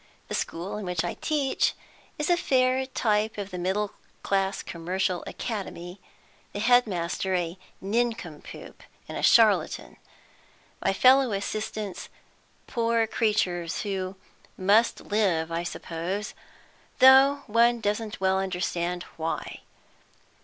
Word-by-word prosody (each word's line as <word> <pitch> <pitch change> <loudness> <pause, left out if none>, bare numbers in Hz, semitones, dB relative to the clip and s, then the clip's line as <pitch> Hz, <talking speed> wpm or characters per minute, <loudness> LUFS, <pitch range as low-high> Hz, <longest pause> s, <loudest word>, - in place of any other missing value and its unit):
The - - -4
school 175 +5 -3
in 210 - -5
which 180 -2 -1
I 175 - -2
teach 290 -4 0 0.4
is 300 +3 0
a - - +6
fair 260 -4 +2
type 220 -4 0
of 200 -1 -5
the 180 - -5
middle 195 +3 -1 0.3
class 195 0 0
commercial 180 +1 -2
'academy;' 190 -4 -6 0.5
the - - -4
headmaster 190 -6 +2
a 175 -1 -2 0.3
nincompoop 215 -6 -3 0.3
and - - -5
charlatan, - - +3 0.9
my - - +3
fellow 255 +3 +5
assistants 210 -1 -4 0.6
poor 230 -1 +1
creatures, 185 -7 0
who 190 -2 -3 0.4
must 205 +5 +3
live, 180 -6 0
I 165 +1 -1
suppose, 175 +4 -4 0.6
though 270 +2 +7
one 235 +2 +3
doesn't 215 0 -2
well 190 0 +2
understand 180 -2 -2
why. 160 0 -4
200 Hz, 110 wpm, -26 LUFS, 180-230 Hz, 0.9 s, though